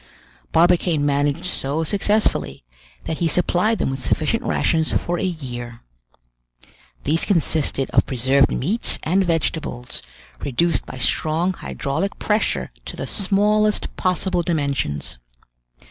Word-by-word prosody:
Barbicane 170 Hz, -2 st, +3 dB
managed 145 Hz, +3 st, +1 dB
so 155 Hz, -3 st, -1 dB
successfully, 205 Hz, -, 0 dB, 0.4 s
that 160 Hz, -, -3 dB
he 170 Hz, -, +2 dB
supplied 180 Hz, +6 st, +2 dB
them -, -, 0 dB
with 135 Hz, 0 st, -5 dB
sufficient 160 Hz, -, +1 dB
rations 160 Hz, -1 st, +1 dB
for 175 Hz, 0 st, -1 dB
a -, -, -2 dB
year. 120 Hz, -9 st, -5 dB, 1.2 s
These 160 Hz, +3 st, +1 dB
consisted 155 Hz, -7 st, +1 dB
of -, -, +3 dB
preserved 130 Hz, +2 st, +3 dB
meats 200 Hz, -, 0 dB
and 190 Hz, +5 st, +2 dB
vegetables, 160 Hz, -7 st, -2 dB, 0.4 s
reduced 165 Hz, +5 st, 0 dB
by -, -, -7 dB
strong 160 Hz, +8 st, 0 dB
hydraulic 160 Hz, +3 st, -3 dB
pressure 215 Hz, +1 st, 0 dB
to -, -, -7 dB
the -, -, -3 dB
smallest 210 Hz, +1 st, +1 dB
possible 185 Hz, 0 st, 0 dB
dimensions. 140 Hz, -, -2 dB
165 Hz, 115 wpm, -21 LUFS, 140-185 Hz, 1.2 s, Barbicane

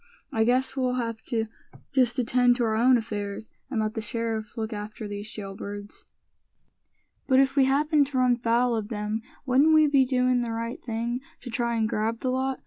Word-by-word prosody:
I 220 Hz, 0 st, +2 dB
guess 255 Hz, +3 st, +1 dB
we'll 255 Hz, -2 st, 0 dB
have 230 Hz, -3 st, -3 dB
to 225 Hz, -3 st, -1 dB, 0.5 s
just 255 Hz, -2 st, +3 dB
attend 245 Hz, 0 st, +3 dB
to 240 Hz, -, 0 dB
our 220 Hz, -1 st, +1 dB
own 245 Hz, +3 st, +5 dB
affairs, 210 Hz, -2 st, -5 dB, 0.2 s
and 255 Hz, -5 st, -1 dB
let 215 Hz, 0 st, -1 dB
the 225 Hz, -, -3 dB
sheriff 225 Hz, 0 st, -3 dB
look 220 Hz, 0 st, -3 dB
after 210 Hz, +1 st, -6 dB
these 205 Hz, +1 st, -6 dB
jail 195 Hz, -3 st, -7 dB
birds." 205 Hz, 0 st, -8 dB, 1.2 s
"But 260 Hz, -1 st, +5 dB
if 270 Hz, 0 st, +3 dB
we 275 Hz, -2 st, +5 dB
happened 290 Hz, +2 st, +3 dB
to 275 Hz, -1 st, -3 dB
run 250 Hz, -1 st, +4 dB
foul 235 Hz, +1 st, +2 dB
of 215 Hz, -2 st, -3 dB
them, 210 Hz, 0 st, -3 dB, 0.2 s
wouldn't 280 Hz, +5 st, +4 dB
we 310 Hz, 0 st, +6 dB
be 280 Hz, -2 st, +4 dB
doin' 250 Hz, -1 st, +2 dB
the 235 Hz, -1 st, -3 dB
right 230 Hz, +2 st, -4 dB
thing 235 Hz, +1 st, -2 dB, 0.2 s
to 245 Hz, -, -8 dB
try 235 Hz, 0 st, 0 dB
and 220 Hz, -1 st, +1 dB
grab 225 Hz, +1 st, -1 dB
the 255 Hz, -, 0 dB
lot?" 265 Hz, +1 st, -1 dB
235 Hz, 200 wpm, -26 LUFS, 220-255 Hz, 1.2 s, we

